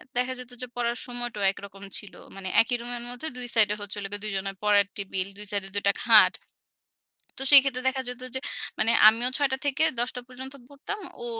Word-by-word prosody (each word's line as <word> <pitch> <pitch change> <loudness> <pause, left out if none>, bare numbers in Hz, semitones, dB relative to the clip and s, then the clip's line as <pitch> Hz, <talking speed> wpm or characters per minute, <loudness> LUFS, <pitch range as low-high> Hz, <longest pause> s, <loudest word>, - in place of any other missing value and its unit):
দেখা 250 +1 0
যেত 250 0 -9
যে 250 - -5
পড়ার 240 0 -1
সময়টাও 240 -4 -4
একরকম 195 0 -12
ছিল। 205 - -9 0.2
মানে 195 -1 -7
একই 245 +2 -1
রুমের 240 0 -5
মধ্যে 245 +6 -3
২ 250 - 0
সাইড 215 -2 +5
এ - - -3
হচ্ছে 205 0 -5 0.3
২ 215 - -1
জনের 195 0 -4
পড়ার 205 -1 +4
টেবল। 190 -2 -3
২ 210 - -8
সাইড 200 -1 -1
এ - - -11
২ 205 - -1
টা 200 - +4
খাট। 225 -3 +7 1.1
তো - - -2
সেই 285 -1 +12
ক্ষেত্রে 260 -2 -2
দেখা 265 0 -2
যেত 250 0 -7
যে, 260 - -1 0.4
মানে 225 - +2 0.2
আমিও 235 +3 +2
৬:০০ 285 -2 +1
টা - - +1
থেকে 285 +3 +2 0.2
১০ঃ০০ 245 +1 0
টা - - -4
পর্যন্ত 260 +2 -9
পড়তাম, 290 +9 -7 0.2
ও - - -4
240 Hz, 215 wpm, -26 LUFS, 205-255 Hz, 1.1 s, সেই